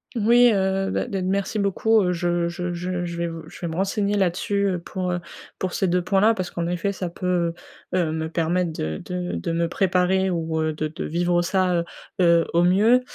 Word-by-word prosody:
Oui, 240 +2 +5
heu, 195 0 0
beh, - - -1
de 195 -2 -3
merci 195 +3 -1
beaucoup, 210 +2 +2
heu, 180 - +1
je 175 0 0
je 175 +1 -3
je 180 +1 -3
je 170 -1 -5
vais 170 0 -1
v 165 0 -7
je - - -12
vais 170 - -2
me 160 - -5
renseigner 200 +2 0
là-dessus, 200 +1 +1
heu, 185 - 0
pour, 180 +1 -4
heu 175 - -1 0.4
pour 185 -1 -3
ces 190 - +1
2 180 0 +1
points-là. 205 +4 +3
Parce 185 -3 -4
qu'en 170 -1 -2
effet 175 +3 -1
ça 185 -2 -4
peut, 175 -1 -1 0.4
heu - - +3
heu, 165 -4 +1
me 160 0 -2
permettre 170 +1 0
de 80 - -4
de 180 0 -4
de 170 - -3
me 170 0 +1
préparer 190 +1 +1
ou, 160 -2 -1
heu, 155 - 0
de 155 0 -2
de 155 - -6
vivre 175 +2 +1
ça, 185 0 +1
heu - - 0 0.4
heu, 170 -1 +5
au 170 - +4
mieux 210 +8 +4
180 Hz, 225 wpm, -23 LUFS, 170-195 Hz, 0.4 s, Oui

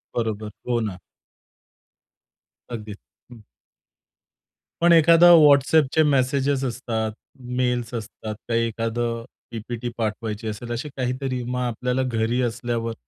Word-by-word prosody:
बरोबर, 110 -2 -2 0.2
हो 120 -1 +1
ना. 100 -5 -4 1.7
अगदीच, 105 -3 -6 0.3
हं. 115 -3 -13 1.4
पण 170 0 +5
एखादा 170 +2 +7
WhatsAppचे 150 0 +5
मेसेज 135 +1 +1 0.2
असतात, 115 -3 -2 0.5
मेल्स 125 -1 -1
असतात, 110 -1 -6
काही 115 0 +1
एखाद 115 +1 -3 0.5
पीपीटी 120 +1 -5
पाठवायची 110 -1 -3
असेल, 115 +3 -5
अशी 125 +6 -4
काहीतरी. 130 0 -2
मग 125 +1 -3
आपल्याला 125 +2 -1
घरी 120 0 0
असल्यावर 115 -1 -2
120 Hz, 105 wpm, -23 LUFS, 110-130 Hz, 1.7 s, एखादा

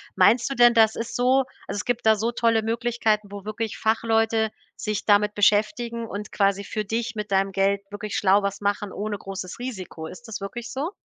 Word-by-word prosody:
Meinst 225 +7 +4
du 275 - -3
denn, 240 0 +6
das 220 -1 +4
ist 230 0 -5
so 255 +2 +4 0.3
also - - -4
es 205 - -2
gibt 245 -2 -1
da 220 - +6
so 225 +3 -1
tolle 230 -2 +2
Möglichkeiten, 225 -2 0
wo 200 -1 -8
wirklich 215 +1 -4
Fachleute 225 0 +1 0.3
sich 210 -1 -3
damit 210 0 +4
beschäftigen 230 +3 +1
und 210 +1 -6
quasi 200 0 +1
für 215 +1 -4
dich 230 +3 -2
mit 210 -1 -5
deinem 195 0 +2
Geld 195 +1 +1
wirklich 205 0 -5
schlau 200 +1 +4
was 200 0 -3
machen 205 -1 -1
ohne 205 0 -3
großes 190 0 -7
Risiko. 190 -10 -6
Ist 235 +9 -11
das 215 - -5
wirklich 225 +4 -6
so? 290 +7 -3
215 Hz, 200 wpm, -24 LUFS, 200-230 Hz, 0.3 s, denn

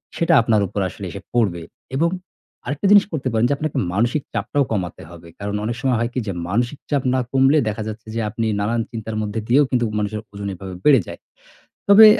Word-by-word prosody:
সেটা 165 0 +2
আপনার 110 -2 +2
উপর 100 - -4
আসলে 100 - -8
এসে 100 - -7
পড়বে 100 -8 +1 0.3
এবং 165 +5 +3 0.6
আরেকটা 145 +8 -3
জিনিস 205 -1 +8
করতে 140 -4 -2
পারেন, 115 +1 +2
যে - - +3
আপনাকে 155 0 -3 0.2
মানসিক 120 +8 +1
চাপটাও 115 +6 0
কমাতে 95 -5 -2
হবে। 85 -1 -12
কারণ 100 0 -3
অনেক 115 +1 -2
সময় 130 -3 +2
হয় 115 - 0
কি, 130 - -1
যে 100 - -1 0.2
মানসিক 120 +7 0
চাপ 140 -3 +1
না 130 - +2
কমলে 135 +3 +4
দেখা 110 +1 -2
যাচ্ছে, 110 +1 -7
যে - - 0
আপনি 115 +2 -2
নানান 115 +3 0
চিন্তার 110 -1 -5
মধ্যে 105 +1 -2
দিয়েও 140 +5 +5
কিন্তু 120 -2 +1
মানুষের 105 +1 -2
ওজন 100 0 -5
এভাবে 95 0 -8
বেড়ে 140 -6 +7
যায়। - - -8 0.7
তবে 215 +2 +10
115 Hz, 205 wpm, -21 LUFS, 105-135 Hz, 0.7 s, তবে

